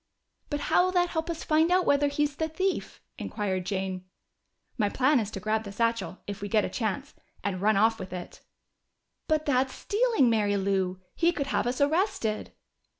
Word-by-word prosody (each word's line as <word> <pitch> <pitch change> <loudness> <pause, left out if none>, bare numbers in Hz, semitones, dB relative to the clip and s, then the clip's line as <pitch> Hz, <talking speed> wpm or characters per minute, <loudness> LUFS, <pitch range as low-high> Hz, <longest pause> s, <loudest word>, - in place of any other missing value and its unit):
"But 290 -1 -2
how 355 - +3
will 370 - 0
that 355 -1 +3
help 320 0 -2
us 330 -1 -3
to - - -7
find 315 +2 +3
out 365 0 +3
whether 285 0 +3
he 285 +1 0
is 290 -1 -2
the 320 - 0
thief?" 375 +4 -2 0.2
inquired 190 -4 -2
Jane. 190 -1 -3 0.7
"My 210 -4 +1
plan 265 +5 +3
is 210 -3 -2
to 205 - -6
grab 215 +2 0
that 200 -2 -8
satchel, 230 -4 0
if 200 -1 -6
we 205 - -4
get 215 -1 +3
a - - -3
chance, 220 -5 -3 0.3
and 185 -2 -2
run 210 0 +3
off 225 +2 +3
with 185 -1 -7
it!" 180 -1 -7 0.9
"But 310 -1 +1
that's 265 -2 +1
stealing, 445 - +2
Mary 210 -3 +2
Lou! 190 -1 0
He 340 +1 +3
could 285 -5 -2
have - - +1
us 250 +1 -1
arrested." 285 - 0
230 Hz, 200 wpm, -28 LUFS, 200-310 Hz, 0.9 s, how